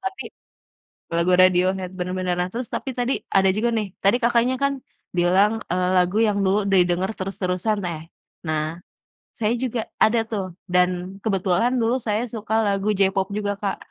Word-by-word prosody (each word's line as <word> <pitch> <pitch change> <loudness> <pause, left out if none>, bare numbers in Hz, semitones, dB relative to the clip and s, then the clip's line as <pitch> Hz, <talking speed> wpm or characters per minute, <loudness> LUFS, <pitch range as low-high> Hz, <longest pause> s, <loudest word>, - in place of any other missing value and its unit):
Tapi 385 0 -4 0.9
lagu 170 +2 +2
Radiohead, 185 0 +2
benar 180 0 -3
benar. 180 -1 0
Nah, 180 - -2
terus 245 +2 -3
tapi 265 - -3
tadi, 245 +2 0 0.2
ada 190 0 +4
juga 230 +3 +1
nih 215 -2 -1 0.2
tadi 200 +5 +4
Kakaknya 240 +2 +3
kan 280 0 +2 0.4
bilang, 185 +4 +4 0.2
eee, 180 0 +1
lagu 180 +3 +2
yang 205 -1 0
dulu 195 +2 +3
didengar 180 +1 +2
terus-terusan, 190 +2 -1
neh. 165 -3 -4 0.5
Nah, 155 -1 0 0.7
saya 220 +1 +1
juga 240 -2 -1 0.2
ada, 230 +2 +4
tuh. 200 -4 -2 0.3
Dan, 180 +2 0
kebetulan, 195 +2 +1
dulu 230 +3 +2
saya 215 +2 +1
suka 220 -1 -5
lagu 200 +1 0
J-pop 195 -1 +2
juga, 205 -1 -1
Kak. 200 -2 -1
195 Hz, 160 wpm, -23 LUFS, 180-220 Hz, 0.9 s, ada